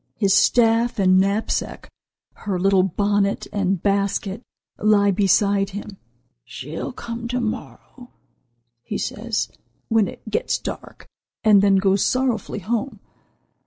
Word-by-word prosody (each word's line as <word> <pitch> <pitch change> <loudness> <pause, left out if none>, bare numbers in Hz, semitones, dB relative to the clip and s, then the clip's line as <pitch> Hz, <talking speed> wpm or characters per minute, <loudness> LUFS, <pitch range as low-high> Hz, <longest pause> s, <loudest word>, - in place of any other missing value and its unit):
His 200 -3 +2
staff 230 +2 +3
and 185 -2 +4
knapsack, 200 +3 -1 0.5
her 200 -4 -4
little 195 0 +4
bonnet 200 +2 0
and 195 -3 -1
basket, 200 +1 0 0.4
lie 205 -1 +4
beside 200 0 +2
him. 205 0 -8 0.5
'She'll 130 +5 -6
come 235 -1 -6
to 250 +1 -2
morrow,' 245 +2 -6 0.7
he 205 - -5
says, 220 0 -3 0.4
when 225 -3 +3
it - - -11
gets 485 +2 -1
dark, - - -8 0.4
and 210 -3 +6
then 200 -1 +4
goes 195 0 +2
sorrowfully 245 -5 -1
home. 225 +3 -3
205 Hz, 120 wpm, -22 LUFS, 195-225 Hz, 0.7 s, and